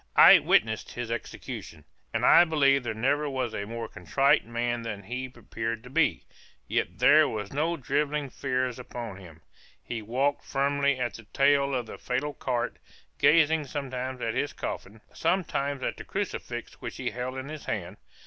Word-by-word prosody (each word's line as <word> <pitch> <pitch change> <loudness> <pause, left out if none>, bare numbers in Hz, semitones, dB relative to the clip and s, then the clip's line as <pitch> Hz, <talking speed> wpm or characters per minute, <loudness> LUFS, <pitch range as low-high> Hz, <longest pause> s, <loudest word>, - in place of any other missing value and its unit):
I - - +10
witnessed - - +1
his - - -4
execution, - - -6 0.3
and - - 0
I 175 - +8
believe 140 -4 +3
there 115 -3 -4
never 145 +6 +1
was 130 -4 -2
a 100 - -3
more 115 0 -5
contrite 135 +2 +2
man 120 0 -1
than 105 -3 -5
he 125 +5 -4
appeared 115 -2 -5
to 125 - -12
be; 165 +2 +2 0.4
yet 90 +3 -1
there 145 +6 +6
were 105 -2 -3
no 160 +4 0
drivelling 145 0 -1
fears 130 -2 -1
upon 120 -5 -7
him 85 -4 -13 0.4
he 115 -2 -4
walked 130 +6 0
firmly 140 0 +1
at 120 -3 -1
the 115 - -11
tail 140 +3 +3
of 125 -2 -1
the - - -9
fatal 140 +4 -2
cart, 125 -4 -2 0.4
gazing 160 -1 +4
sometimes 130 -2 -4
at 115 - -1
his 140 +4 -1
coffin, 110 +3 -6
sometimes 145 -6 0
at - - -2
the - - -7
crucifix - - -5
which - - -6
he - - -2
held 125 +3 -4
in 130 +2 -6
his 155 -1 -7
hand. - - -4
130 Hz, 170 wpm, -28 LUFS, 115-140 Hz, 0.4 s, I